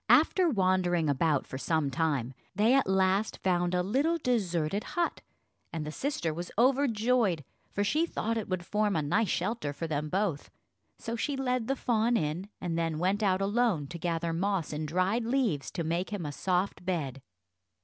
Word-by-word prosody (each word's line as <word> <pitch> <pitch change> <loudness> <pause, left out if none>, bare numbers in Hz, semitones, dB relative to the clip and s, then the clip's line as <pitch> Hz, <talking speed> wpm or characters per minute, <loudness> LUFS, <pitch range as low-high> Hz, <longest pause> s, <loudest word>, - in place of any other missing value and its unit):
After 365 -3 +5
wandering 185 - +2
about 145 +1 +2
for 130 - -6
some 155 -2 0
time, 140 -4 0 0.2
they 215 +5 +4
at 270 -5 +3
last 190 +2 +2
found 175 -1 +1
a 180 - +2
little 280 - +1
deserted 200 - 0
hut, 345 -1 -2 0.5
and 160 -2 -4
the 150 - -4
sister 170 - -2
was 175 +3 -5
overjoyed, 235 - +2 0.3
for 205 - -1
she 305 +11 +2
thought 230 -7 -2
it 220 -3 -3
would 185 -2 -2
form 210 0 +1
a 155 - +1
nice 205 +8 +1
shelter 190 -4 -1
for 165 - -4
them 150 -1 -2
both. 185 -5 -1 0.5
So 230 - -4
she 280 +5 -1
led 250 -3 0
the 270 - +1
fawn 235 -2 +2
in, 165 +5 -2
and 170 -2 -2
then 165 -2 -1
went 190 +5 +1
out 190 -2 +2
alone, 205 -6 +1
to 170 0 -7
gather 165 0 -1
moss 185 -2 -1
and 155 +1 -3
dried 185 +8 +1
leaves, 230 - 0
to 170 - -3
make 170 +3 -1
him 205 -6 -4
a 145 - -3
soft 180 +5 -1
bed. 150 -8 -2
185 Hz, 180 wpm, -30 LUFS, 165-225 Hz, 0.5 s, After